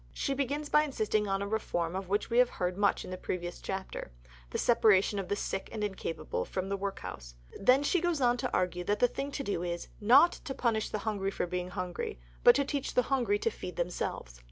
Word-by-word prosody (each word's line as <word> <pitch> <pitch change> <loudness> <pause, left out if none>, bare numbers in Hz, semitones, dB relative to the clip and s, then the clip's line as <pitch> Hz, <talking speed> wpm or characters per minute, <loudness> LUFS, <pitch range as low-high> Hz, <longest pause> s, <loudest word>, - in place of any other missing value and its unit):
She 275 - -1
begins 285 +2 -1
by 300 - +5
insisting 215 -7 0
on 195 0 0
a - - -3
reform 175 -5 -1
of 190 -1 -4
which 205 +1 +1
we 235 - +4
have 250 -1 +6
heard 180 0 -2
much 200 0 +1
in 185 - -6
a - - -4
previous 175 -1 -4
chapter: 190 - -5 0.4
the - - -3
separation 210 -4 +4
of 190 - -4
the 205 - 0
sick 195 -1 -3
and 215 -2 -3
incapable 190 -5 -3
from 190 0 -4
the 200 - 0
workhouse. 195 - -6 0.2
Then 255 +7 +5
she 340 +4 +2
goes 345 -3 +1
on 245 -2 +3
to - - -2
argue 180 -1 0
that 205 +2 +1
the 245 - +4
thing 275 +3 -4
to 275 - -3
do 200 -8 -2
is 175 -1 -4
"not 260 +11 +7
to 270 - -7
punish 220 -3 0
the - - -2
hungry 200 -3 0
for 195 - -2
being 180 0 -3
hungry, 180 - -4 0.2
but - - +8
to 280 - +2
teach 280 -1 -3
the 250 - +5
hungry 235 -6 +2
to 230 - 0
feed 180 -3 -7
themselves." 170 - -3
205 Hz, 225 wpm, -31 LUFS, 185-245 Hz, 0.4 s, but